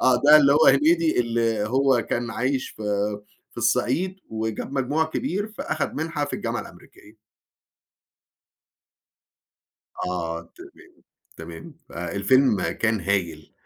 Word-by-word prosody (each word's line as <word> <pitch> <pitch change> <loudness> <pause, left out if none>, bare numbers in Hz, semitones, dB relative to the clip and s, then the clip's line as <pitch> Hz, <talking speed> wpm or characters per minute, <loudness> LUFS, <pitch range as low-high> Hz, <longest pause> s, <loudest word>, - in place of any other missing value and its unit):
آه، 130 -1 +5
ده 150 +1 +10
اللي 140 -2 +5
هو 155 +2 +4
هنيدي 155 +1 +4
اللي 115 -2 0
هو 130 -1 +2
كان 120 0 -1
عايش 130 +4 -1
في 110 - -11 0.7
في - - -26
الصعيد 125 - 0
وجاب 110 +3 -4
مجموع 140 +4 0
كبير، 205 - -3
فأخَد - - -3
منها 155 -1 -2
في 145 - -8
الجامعة - - -3
الأمريكية. 105 +2 -15 2.9
آه، 85 -2 -3
تمام، 360 -1 -16 0.3
تمام. 170 -3 -10 0.2
فالفيلم 100 +6 +1
كان 110 -1 0
هايل. 85 -5 -2
125 Hz, 115 wpm, -24 LUFS, 110-155 Hz, 2.9 s, ده